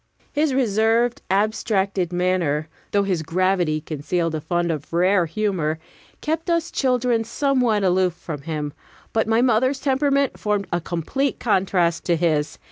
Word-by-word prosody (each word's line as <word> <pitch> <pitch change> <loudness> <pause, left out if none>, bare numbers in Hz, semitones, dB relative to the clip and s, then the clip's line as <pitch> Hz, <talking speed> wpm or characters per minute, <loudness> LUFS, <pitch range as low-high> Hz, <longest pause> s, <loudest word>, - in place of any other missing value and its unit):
His 300 0 +2
reserved, 235 +1 +2
abstracted 195 -2 0
manner, 175 -4 0 0.2
though 200 -1 +2
his 185 -4 0
gravity 175 -1 +1
concealed 160 +2 -2
a 155 - -2
fund 175 +2 0
of 150 -2 -5
rare 180 +1 +3
humor, 165 -4 -1 0.4
kept 320 +3 -2
us 335 -1 0
children 250 -3 +1
somewhat 250 -4 +1
aloof 185 -1 +2
from 155 -4 -7
him; 150 -2 -4 0.4
but 220 -1 +1
my 225 +2 +3
mother's 255 +3 +2
temperament 275 0 +1
formed 210 -1 0
a 175 - +1
complete 180 - -2
contrast 185 -6 +1
to 170 - +2
his. 155 -3 0
190 Hz, 140 wpm, -22 LUFS, 170-240 Hz, 0.4 s, rare